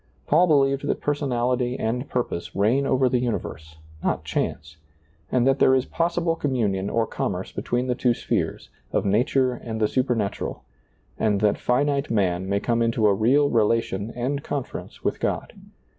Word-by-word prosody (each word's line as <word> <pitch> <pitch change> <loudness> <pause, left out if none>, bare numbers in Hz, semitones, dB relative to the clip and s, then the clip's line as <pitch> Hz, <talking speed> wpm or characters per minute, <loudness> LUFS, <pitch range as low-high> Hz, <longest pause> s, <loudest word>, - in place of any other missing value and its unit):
Paul 170 +5 +4
believed 140 -3 +2
that - - 0
personality 125 -3 0
and 125 +5 -2
purpose 120 -8 -3
reign 115 +8 +2
over 130 -1 +3
the 125 0 +1
universe, 80 -10 -4 0.3
not - - 0
chance, 75 0 -3 0.5
and 125 -1 +2
that 135 +1 +3
there 130 - +5
is 130 0 +1
possi 170 +1 -1
ble 165 -1 +1
communion 105 -10 0
or 115 -1 +1
commerce - - -3
between 120 +1 -2
the 125 - 0
two 125 -1 +1
spheres, - - -2 0.2
of - - 0
nature 125 +5 +2
and 115 -2 -6
the 105 - +3
supernatural, 115 -5 -1 0.6
and 105 -2 +2
that 105 -1 +2
finite 140 +3 +1
man 95 -4 0
may 100 0 +1
come 115 +2 0
into 115 -1 +1
a 105 - +5
real 135 +8 +3
relation 110 -2 +1
and 135 +4 -2
con 140 -2 -2
ference - - -10
with - - -1
God. - - -2
120 Hz, 170 wpm, -24 LUFS, 110-135 Hz, 0.6 s, there